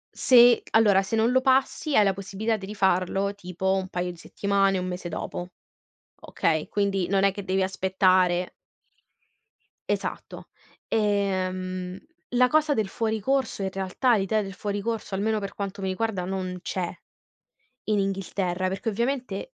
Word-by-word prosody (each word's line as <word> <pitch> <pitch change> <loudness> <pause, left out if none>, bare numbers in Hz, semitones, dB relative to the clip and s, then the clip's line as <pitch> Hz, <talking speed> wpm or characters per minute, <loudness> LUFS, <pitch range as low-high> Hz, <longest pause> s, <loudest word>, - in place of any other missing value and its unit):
Se 240 -2 +6
allora, 210 -3 +5
se 195 +3 -3
non 225 +2 +3
lo 260 +1 +3
passi, 270 +3 +1
hai 210 - +7
la 195 -1 +2
possibilità 200 +3 -2
di 195 -3 -7
rifarlo, 195 -1 +1
tipo, 190 -1 -2
un 190 -1 -1
paio 180 -1 -3
di 175 - -13
settimane, 195 +2 0
1 180 - -2
mese 180 -1 -5
dopo, 175 +2 -5 0.7
okay, 155 -2 -1
quindi, 195 -3 0
non 195 0 +2
è 195 - +4
che 200 0 -7
devi 190 +1 0
aspettare 185 -1 +2 1.3
Esatto. - - -4 0.4
Ehm, 185 -3 -1 0.4
la 250 +1 +6
cosa 310 +1 +3
del 220 -4 0
fuori 220 +2 -1
corso 265 -2 0
in 190 - -1
realtà, 195 +7 +1
l'idea 205 +2 +1
del 195 -2 -6
fuori 205 +1 -3
corso, 220 -1 -3
almeno, 215 +2 0
per 200 -1 -5
quanto 200 -1 -5
mi 190 - -1
riguarda, 190 -1 -2
non 185 -1 -4
c'è, 180 -2 -2 1.0
in 215 -1 +1
Inghilterra, 190 -2 -1
perché 190 +3 -2
ovviamente 255 - -3
195 Hz, 155 wpm, -26 LUFS, 185-220 Hz, 1.3 s, hai